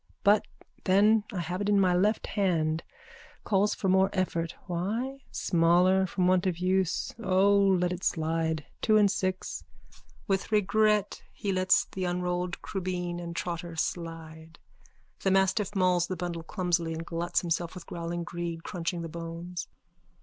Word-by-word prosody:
But 205 Hz, +1 st, +4 dB, 0.4 s
then 205 Hz, +3 st, +4 dB
I 185 Hz, -5 st, -3 dB
have 175 Hz, +3 st, -3 dB
it 205 Hz, -, 0 dB
in 205 Hz, -1 st, +4 dB
my 185 Hz, -2 st, +4 dB
left 205 Hz, +5 st, +2 dB
hand. 165 Hz, -5 st, 0 dB, 0.6 s
Calls 205 Hz, 0 st, +2 dB
for 195 Hz, -, -2 dB
more 190 Hz, +1 st, +4 dB
effort. 170 Hz, -3 st, -1 dB
Why? 220 Hz, +10 st, -2 dB
Smaller 180 Hz, +2 st, +3 dB
from 180 Hz, 0 st, 0 dB
want 185 Hz, 0 st, +3 dB
of 180 Hz, -3 st, -1 dB
use. 185 Hz, 0 st, 0 dB
O, 195 Hz, +1 st, +4 dB
let 190 Hz, -3 st, +3 dB
it 180 Hz, -, -7 dB
slide. 160 Hz, -1 st, 0 dB, 0.2 s
Two 215 Hz, -1 st, +4 dB
and 205 Hz, -2 st, +5 dB
six. 185 Hz, -2 st, -3 dB, 0.6 s
_(With 195 Hz, -2 st, 0 dB
regret 210 Hz, 0 st, +2 dB
he 205 Hz, -2 st, -3 dB
lets 185 Hz, 0 st, +3 dB
the 185 Hz, -1 st, -4 dB
unrolled 180 Hz, 0 st, -2 dB
crubeen 180 Hz, -2 st, -3 dB
and 170 Hz, -1 st, -6 dB
trotter 170 Hz, -1 st, -4 dB
slide. 165 Hz, -1 st, -5 dB, 0.6 s
The 195 Hz, -, 0 dB
mastiff 190 Hz, +2 st, +2 dB
mauls 180 Hz, -2 st, +3 dB
the 185 Hz, -, -4 dB
bundle 170 Hz, -1 st, -4 dB
clumsily 170 Hz, -1 st, -1 dB
and 165 Hz, +1 st, -5 dB
gluts 170 Hz, +1 st, -1 dB
himself 170 Hz, 0 st, -2 dB
with 180 Hz, -, -9 dB
growling 170 Hz, 0 st, -4 dB
greed, 170 Hz, -1 st, -5 dB
crunching 170 Hz, -1 st, -3 dB
the -, -, -4 dB
bones. 170 Hz, +2 st, -6 dB
180 Hz, 150 wpm, -28 LUFS, 170-190 Hz, 0.6 s, and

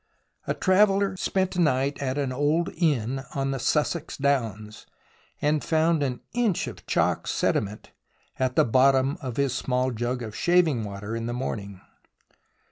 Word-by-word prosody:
A -, -, 0 dB
traveller 195 Hz, 0 st, +3 dB
spent 190 Hz, 0 st, -1 dB
a 180 Hz, -, +2 dB
night 140 Hz, -2 st, +1 dB
at 135 Hz, 0 st, -2 dB
an 140 Hz, -3 st, -1 dB
old 150 Hz, +5 st, +1 dB
inn 135 Hz, -6 st, 0 dB
on 135 Hz, 0 st, 0 dB
the 135 Hz, -, -3 dB
Sussex 150 Hz, +5 st, -1 dB
downs, 110 Hz, -7 st, -2 dB, 0.6 s
and 150 Hz, 0 st, +2 dB
found 160 Hz, 0 st, +2 dB
an 130 Hz, -3 st, -2 dB
inch 235 Hz, -7 st, +1 dB
of -, -, -10 dB
chalk -, -, +1 dB
sediment 105 Hz, +1 st, -1 dB, 0.5 s
at 130 Hz, -1 st, 0 dB
the -, -, +5 dB
bottom 135 Hz, +5 st, +3 dB
of 125 Hz, -3 st, -5 dB
his 140 Hz, -3 st, +1 dB
small 130 Hz, 0 st, 0 dB
jug 120 Hz, +2 st, -2 dB
of 110 Hz, -2 st, -7 dB
shaving 170 Hz, -9 st, +2 dB
water 105 Hz, +2 st, -5 dB
in 115 Hz, 0 st, -3 dB
the 120 Hz, -, -3 dB
morning. 100 Hz, -6 st, -5 dB
135 Hz, 155 wpm, -26 LUFS, 120-160 Hz, 0.6 s, the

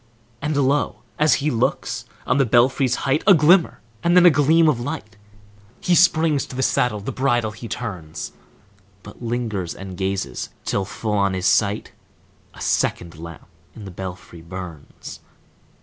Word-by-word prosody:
And 150 Hz, 0 st, -1 dB
lo! 140 Hz, +1 st, 0 dB, 0.2 s
as 150 Hz, +1 st, +5 dB
he 150 Hz, -, +2 dB
looks, 115 Hz, -, -1 dB, 0.2 s
on 130 Hz, -, +1 dB
the 135 Hz, -, +4 dB
belfry's 125 Hz, +2 st, +3 dB
height 140 Hz, +3 st, +1 dB
A 195 Hz, -, +9 dB
glimmer, 165 Hz, -, +4 dB, 0.2 s
and 175 Hz, +1 st, +3 dB
then 180 Hz, -, +7 dB
a 175 Hz, -, +9 dB
gleam 155 Hz, +3 st, +4 dB
of 145 Hz, -6 st, +2 dB
light! 120 Hz, -5 st, -6 dB, 0.6 s
He 180 Hz, -, +1 dB
springs 160 Hz, -4 st, +3 dB
to -, -, -9 dB
the 130 Hz, -, -1 dB
saddle, 125 Hz, -4 st, +1 dB
the 105 Hz, +7 st, -5 dB
bridle 120 Hz, -4 st, 0 dB
he 110 Hz, +2 st, -9 dB
turns, 80 Hz, -10 st, -6 dB, 0.7 s
But -, -, -13 dB
lingers 115 Hz, -7 st, -3 dB
and 95 Hz, -1 st, -8 dB
gazes, 95 Hz, -9 st, -3 dB, 0.2 s
till 100 Hz, -, -1 dB
full 105 Hz, +2 st, -4 dB
on 100 Hz, -2 st, +1 dB
his 95 Hz, 0 st, -3 dB
sight 105 Hz, +2 st, +2 dB, 0.6 s
A -, -, -12 dB
second 85 Hz, -1 st, -1 dB
lamp 85 Hz, -1 st, -10 dB, 0.3 s
in 105 Hz, -, -10 dB
the 95 Hz, -, -8 dB
belfry 90 Hz, -2 st, -8 dB
burns! 85 Hz, -3 st, -9 dB
115 Hz, 160 wpm, -22 LUFS, 95-140 Hz, 0.7 s, A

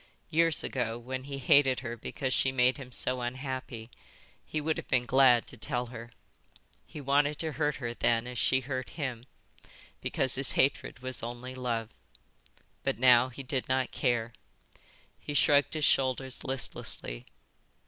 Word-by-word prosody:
Years 165 Hz, -1 st, +3 dB
ago, 120 Hz, -3 st, -2 dB
when 130 Hz, +2 st, -6 dB
he 140 Hz, -1 st, -5 dB
hated 135 Hz, -1 st, +4 dB
her 120 Hz, -2 st, -5 dB
because 130 Hz, +3 st, -3 dB
she 135 Hz, -, +3 dB
made 130 Hz, 0 st, +3 dB
him 130 Hz, -3 st, -10 dB
so 125 Hz, +1 st, 0 dB
unhappy, 130 Hz, -2 st, -5 dB, 0.5 s
he 155 Hz, -, -3 dB
would 155 Hz, +1 st, -1 dB
have -, -, -6 dB
been 125 Hz, -1 st, +2 dB
glad 125 Hz, -2 st, +5 dB
to 125 Hz, -, -5 dB
tell 125 Hz, +1 st, -2 dB
her. 115 Hz, 0 st, -8 dB, 0.8 s
He -, -, -9 dB
wanted 145 Hz, +1 st, +2 dB
to 160 Hz, -1 st, -2 dB
hurt 150 Hz, -1 st, 0 dB
her 120 Hz, -3 st, -4 dB
then 115 Hz, 0 st, +1 dB
as 125 Hz, -1 st, -5 dB
she 130 Hz, -, +3 dB
hurt 130 Hz, 0 st, -4 dB
him, 130 Hz, -5 st, -4 dB, 0.7 s
because 130 Hz, -1 st, 0 dB
his 135 Hz, 0 st, +3 dB
hatred 135 Hz, -1 st, +1 dB
was 130 Hz, -1 st, -2 dB
only 120 Hz, +2 st, -6 dB
love. 120 Hz, -3 st, -2 dB, 0.9 s
But -, -, -1 dB
now 125 Hz, 0 st, +6 dB
he 130 Hz, +2 st, -9 dB
did 130 Hz, 0 st, -2 dB
not 130 Hz, -1 st, +1 dB
care. 120 Hz, -3 st, 0 dB, 0.9 s
He 145 Hz, -, -6 dB
shrugged 145 Hz, +1 st, +4 dB
his 155 Hz, -1 st, +1 dB
shoulders 130 Hz, 0 st, +1 dB
listlessly. 125 Hz, -, -4 dB
130 Hz, 160 wpm, -30 LUFS, 120-135 Hz, 0.9 s, now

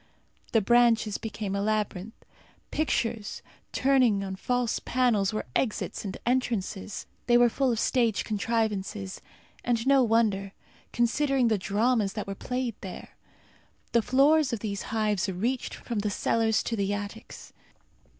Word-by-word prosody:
The 225 Hz, -, +4 dB
branches 230 Hz, -1 st, +3 dB
became 210 Hz, -3 st, -4 dB
a 200 Hz, -, 0 dB
labyrinth. 210 Hz, 0 st, -2 dB, 0.6 s
Pictures 230 Hz, -7 st, -1 dB, 0.3 s
turning 255 Hz, -7 st, +3 dB
on 190 Hz, -1 st, -4 dB
false 245 Hz, +3 st, -1 dB
panels 240 Hz, -6 st, +1 dB
were 215 Hz, -, -3 dB
exits 225 Hz, -5 st, -1 dB
and 195 Hz, -2 st, -5 dB
entrances. 225 Hz, -6 st, -1 dB, 0.2 s
They 240 Hz, -1 st, +6 dB
were 240 Hz, 0 st, +5 dB
full 260 Hz, +2 st, +1 dB
of 230 Hz, -, -1 dB
stage 230 Hz, -5 st, +1 dB
contrivances, 210 Hz, -3 st, -2 dB, 0.4 s
and 235 Hz, -1 st, 0 dB
no 275 Hz, 0 st, +5 dB
wonder 215 Hz, -4 st, +1 dB, 0.4 s
considering 255 Hz, +1 st, +2 dB
the 215 Hz, -3 st, +1 dB
dramas 210 Hz, +1 st, +1 dB
that 210 Hz, -, -4 dB
were 195 Hz, -, -4 dB
played 250 Hz, +3 st, -3 dB
there! 190 Hz, -3 st, -8 dB, 0.8 s
The 235 Hz, -, +4 dB
floors 280 Hz, +5 st, +4 dB
of 230 Hz, -3 st, -3 dB
these 200 Hz, -3 st, -3 dB
hives 210 Hz, -3 st, 0 dB
reached 230 Hz, +8 st, -2 dB
from 230 Hz, -3 st, -4 dB
the 210 Hz, +1 st, -1 dB
cellars 220 Hz, +1 st, +1 dB
to 230 Hz, -, -2 dB
the 200 Hz, -2 st, -1 dB
attics. 205 Hz, +2 st, -8 dB
225 Hz, 140 wpm, -27 LUFS, 205-245 Hz, 0.8 s, They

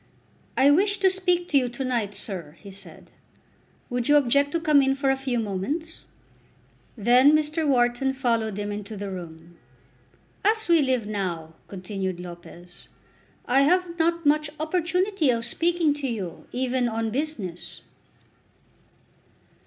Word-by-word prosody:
"I 275 Hz, +2 st, +6 dB
wish 400 Hz, +7 st, +3 dB
to 380 Hz, -1 st, +5 dB
speak 360 Hz, -2 st, 0 dB
to 280 Hz, -, +4 dB
you 250 Hz, -2 st, -1 dB
to 260 Hz, +2 st, -5 dB
night, 230 Hz, -5 st, -1 dB
sir," 170 Hz, -7 st, -3 dB
he 200 Hz, -, -11 dB
said. 195 Hz, -, -9 dB, 0.8 s
"Would 245 Hz, +1 st, -2 dB
you 295 Hz, -, +6 dB
object 280 Hz, +1 st, +3 dB
to 335 Hz, -, +1 dB
come 305 Hz, -4 st, +4 dB
in 270 Hz, 0 st, +2 dB
for 275 Hz, -1 st, +1 dB
a -, -, +2 dB
few 265 Hz, -2 st, -2 dB
moments?" 230 Hz, -, -3 dB, 0.9 s
Then 250 Hz, +7 st, +5 dB
Mr. 305 Hz, +1 st, +1 dB
Wharton 245 Hz, 0 st, +2 dB
followed 230 Hz, -5 st, -1 dB
him 205 Hz, 0 st, -3 dB
into 205 Hz, +1 st, -6 dB
the 200 Hz, 0 st, -5 dB
room. 170 Hz, -2 st, -10 dB, 0.9 s
"As 440 Hz, +1 st, +2 dB
we 335 Hz, -2 st, +5 dB
live 260 Hz, -5 st, +1 dB
now," 180 Hz, -6 st, -4 dB
continued 190 Hz, -1 st, -5 dB
Lopez, 175 Hz, 0 st, -12 dB, 0.6 s
"I 265 Hz, +2 st, +3 dB
have 345 Hz, +3 st, +1 dB
not 335 Hz, 0 st, +1 dB
much 300 Hz, +1 st, +3 dB
opportunity 360 Hz, +1 st, 0 dB
of 230 Hz, -1 st, +1 dB
speaking 335 Hz, +3 st, +1 dB
to 290 Hz, -2 st, -4 dB
you, 200 Hz, -8 st, -5 dB
even 250 Hz, -1 st, 0 dB
on 225 Hz, 0 st, -2 dB
business." 230 Hz, -, -5 dB
255 Hz, 145 wpm, -25 LUFS, 205-310 Hz, 0.9 s, I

